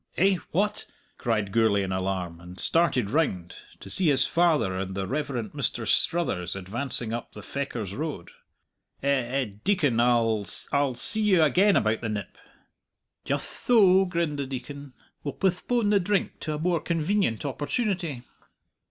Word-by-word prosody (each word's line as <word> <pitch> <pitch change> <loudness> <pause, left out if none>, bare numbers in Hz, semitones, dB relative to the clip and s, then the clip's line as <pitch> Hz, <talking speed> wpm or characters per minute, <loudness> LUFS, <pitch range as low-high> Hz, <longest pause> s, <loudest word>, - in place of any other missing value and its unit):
"Eh? 190 +1 +4
what?" 210 +4 0 0.3
cried 110 -5 -1
Gourlay 110 -2 +3
in 95 - -3
alarm, 95 -3 -2
and 90 +2 -12
started 135 -11 +1
round, 95 - 0 0.2
to - - -11
see 160 - +4
his 140 -3 +4
father 160 - +2
and 95 0 -4
the 95 -1 -2
Rev. 145 +6 -2
Mr. 120 -7 -3
Struthers 95 - +1
advancing 115 +4 -2
up 120 - -5
the 105 - -10
Fechars 120 -7 -4
Road. 145 - -5 0.7
"Eh 140 - +1
eh 135 0 +1 0.2
Deacon 145 - +2
I 115 -3 +3 0.3
I'll 140 -3 +1
see 215 - 0
you 190 -6 +4
again 190 +8 +4
about 110 +1 +1
the 115 - -3
nip." 105 -4 -5 0.9
"Jutht - - -4
tho," 195 -5 +6
grinned 170 -5 -1
the 140 - -2
Deacon. 135 +1 -7 0.3
"We'll 145 - -4
postpone 205 +4 +1
the 205 - +4
drink 195 +1 -1
to 155 - -3
a - - -3
more 170 +2 +1
convenient 165 - 0
opportunity." 160 - -2
140 Hz, 150 wpm, -26 LUFS, 110-170 Hz, 0.9 s, tho